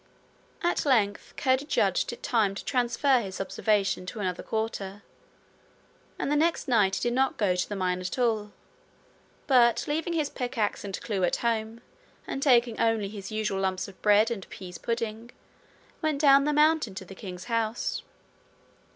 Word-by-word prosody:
At 345 - +1
length 215 -8 +1
Curdie 260 +1 +1
judged - - +1
it - - -10
time 215 -6 +1
to - - -7
transfer 255 +1 +2
his 190 -3 -6
observation 195 -1 0
to 215 - -6
another 185 -3 -2
quarter, 205 -3 -4 1.1
and - - -2
the - - +3
next 330 +3 +1
night 210 -6 +3
he - - -3
did 240 0 +1
not 265 +1 +1
go 195 -4 +2
to 180 - -2
the 205 - -3
mine 180 -1 -1
at 185 +6 -4
all; 220 -4 0 0.9
but, 240 -4 +4
leaving 320 +3 -1
his 305 -3 -1
pickaxe 245 -5 -2
and 195 -2 -5
clue 200 -4 -2
at 175 - +2
home, 225 0 -1 0.4
and 270 - -4
taking 240 -4 +3
only 225 -3 +1
his 200 -1 -8
usual 215 -3 -1
lumps 190 0 -1
of 195 - -14
bread 210 +2 +4
and 195 -5 -5
pease 180 -2 -9
pudding, 230 0 -3 0.7
went 310 -3 0
down 275 -1 +6
the 300 - +2
mountain 300 -8 +3
to 190 - -7
the 195 - -10
king's 185 -2 -8
house. 230 0 -1
220 Hz, 170 wpm, -27 LUFS, 195-255 Hz, 1.1 s, down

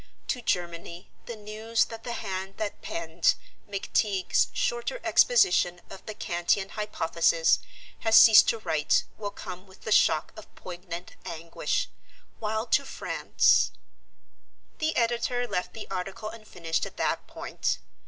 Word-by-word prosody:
To 250 - -1
Germany 175 -2 -3 0.2
the 235 - -5
news 215 +2 -1
that 225 0 -9
the 240 - -4
hand 190 -3 -5
that 215 -2 -4
penned 165 0 0 0.3
'McTeague's 200 -1 +1
Shorter 240 - -1
Exposition 385 - +4
of 195 - -10
the 215 - -5
Kantian 175 +2 0
Hypothesis' 170 -5 +2 0.4
has 225 -1 +3
ceased 220 -2 +9
to 230 - +1
write 155 -8 +1 0.2
will 205 -1 -3
come 185 -1 -9
with 190 - -18
the 220 - -5
shock 160 -6 +3
of 215 - -13
poignant 175 0 -8
anguish; 170 - -2 0.5
while 220 +1 -1
to 250 - +3
France 270 - +2 0.6
" - - -41
The 315 0 0
editor 240 +1 +1
left 180 - -3
the 220 - -8
article 195 +3 -4
unfinished 180 -7 -3
at - - -14
that - - -1
point. - - -2
205 Hz, 135 wpm, -27 LUFS, 175-225 Hz, 0.6 s, ceased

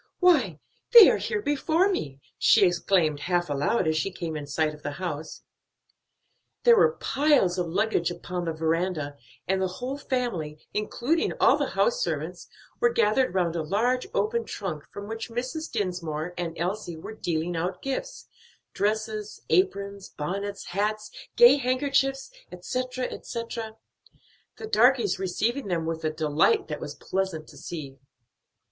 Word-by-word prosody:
"Why, 275 - +4 0.3
they 470 -3 +11
are - - +1
here 445 -3 -2
before 315 +5 +2
me!" 140 - -3 0.2
she 210 -3 +6
exclaimed 175 -4 +2
half 175 -1 0
aloud 145 +7 +1
as 155 - +2
she 155 +5 0
came 170 -4 -5
in 150 -1 -5
sight 155 +2 0
of 150 - -13
the 145 0 -4
house. 155 -2 -5 1.2
There 475 -1 +7
were 465 +1 +4
piles 270 - +2
of 175 - -1
luggage 195 0 +1
upon 175 0 -5
the 165 - -1
veranda, 160 -2 -1 0.3
and 190 0 +1
the 190 - +2
whole 265 +3 -4
family, 235 - -2 0.2
including 240 +9 0
all - - +6
the - - -1
house - - +2
servants, - - -3 0.3
were 470 - +4
gathered 215 - +2
round 175 -3 +1
a 165 - 0
large 235 - 0
open 470 0 0
trunk 170 -8 -5
from 205 0 -8
which 225 +2 -5
Mrs. 255 +7 -4
Dinsmore 175 -6 -3
and 170 -2 -4
Elsie 175 0 -3
were 160 - -8
dealing 170 -4 -2
out 180 +2 -3
gifts 385 - -4 0.5
dresses, 215 0 -2
aprons, 195 +3 0
bonnets, 200 +6 -4
hats, 210 +3 -2 0.2
gay 240 +4 +8
handkerchiefs, 270 - 0 0.2
etc., 255 +8 -3
etc.; 230 -2 -5 0.8
the - - -6
darkies 235 - +3
receiving 215 +7 -1
them 170 -3 -1
with 160 0 -3
a 155 - +1
delight 155 - +2
that - - -4
was - - -6
pleasant 185 -5 -3
to - - -14
see. 140 -6 -7
195 Hz, 150 wpm, -26 LUFS, 165-255 Hz, 1.2 s, they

